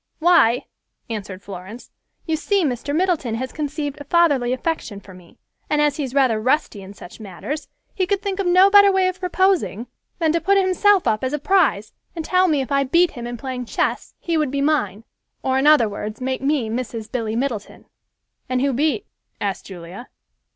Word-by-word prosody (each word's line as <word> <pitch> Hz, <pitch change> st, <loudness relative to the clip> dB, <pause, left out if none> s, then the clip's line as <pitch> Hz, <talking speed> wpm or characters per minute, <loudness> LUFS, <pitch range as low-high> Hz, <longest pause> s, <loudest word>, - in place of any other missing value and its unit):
"Why," 290 Hz, -8 st, +4 dB, 0.5 s
answered 200 Hz, -3 st, -6 dB
Florence, 195 Hz, +4 st, -10 dB, 0.3 s
"you 320 Hz, -, 0 dB
see, 380 Hz, +3 st, +1 dB
Mr. 275 Hz, +2 st, -2 dB
Middleton 325 Hz, -10 st, 0 dB
has 255 Hz, +2 st, -4 dB
conceived 290 Hz, -1 st, -4 dB
a -, -, -8 dB
fatherly 285 Hz, -6 st, +2 dB
affection 255 Hz, -6 st, -3 dB
for 195 Hz, -1 st, -14 dB
me, 180 Hz, -2 st, -17 dB, 0.3 s
and 300 Hz, -, +1 dB
as 295 Hz, -1 st, +2 dB
he 300 Hz, -, -2 dB
is 265 Hz, 0 st, -6 dB
rather 250 Hz, -6 st, +3 dB
rusty 255 Hz, -4 st, 0 dB
in 195 Hz, +1 st, -11 dB
such 180 Hz, -, -12 dB
matters, 220 Hz, -, -6 dB, 0.3 s
he 375 Hz, -3 st, -1 dB
could 400 Hz, 0 st, +1 dB
think 400 Hz, -1 st, -4 dB
of 390 Hz, -, 0 dB
no 370 Hz, +3 st, +6 dB
better 405 Hz, -1 st, +7 dB
way 380 Hz, -1 st, +2 dB
of 370 Hz, 0 st, -3 dB
proposing 365 Hz, -, +1 dB, 0.3 s
than 320 Hz, -3 st, +1 dB
to 335 Hz, +1 st, 0 dB
put 395 Hz, +1 st, +3 dB
himself 385 Hz, +1 st, +3 dB
up 215 Hz, +2 st, +1 dB
as 260 Hz, +2 st, -1 dB
a -, -, +1 dB
prize, 290 Hz, -, +1 dB, 0.2 s
and 325 Hz, -2 st, -5 dB
tell 370 Hz, 0 st, +3 dB
me 300 Hz, -5 st, +2 dB
if 265 Hz, -, -6 dB
I 275 Hz, 0 st, +3 dB
beat 335 Hz, +6 st, +3 dB
him 240 Hz, -2 st, -7 dB
in 240 Hz, 0 st, -5 dB
playing 255 Hz, 0 st, -5 dB
chess, -, -, -2 dB
he 335 Hz, -2 st, -2 dB
would 305 Hz, -3 st, +1 dB
be 280 Hz, +1 st, -2 dB
mine, 255 Hz, -9 st, 0 dB, 0.4 s
or 265 Hz, 0 st, +1 dB
in 280 Hz, -, +2 dB
other 300 Hz, -7 st, +6 dB
words, 210 Hz, +1 st, -6 dB
make 260 Hz, 0 st, -3 dB
me 275 Hz, -4 st, 0 dB
Mrs. 225 Hz, -1 st, -5 dB
Billy 225 Hz, -3 st, -2 dB
Middleton." 235 Hz, -4 st, -4 dB, 0.6 s
"And 255 Hz, 0 st, 0 dB
who 275 Hz, 0 st, +1 dB
beat?" 275 Hz, -4 st, 0 dB, 0.3 s
asked 195 Hz, -3 st, -3 dB
Julia. 185 Hz, +5 st, -10 dB
275 Hz, 200 wpm, -21 LUFS, 225-335 Hz, 0.6 s, better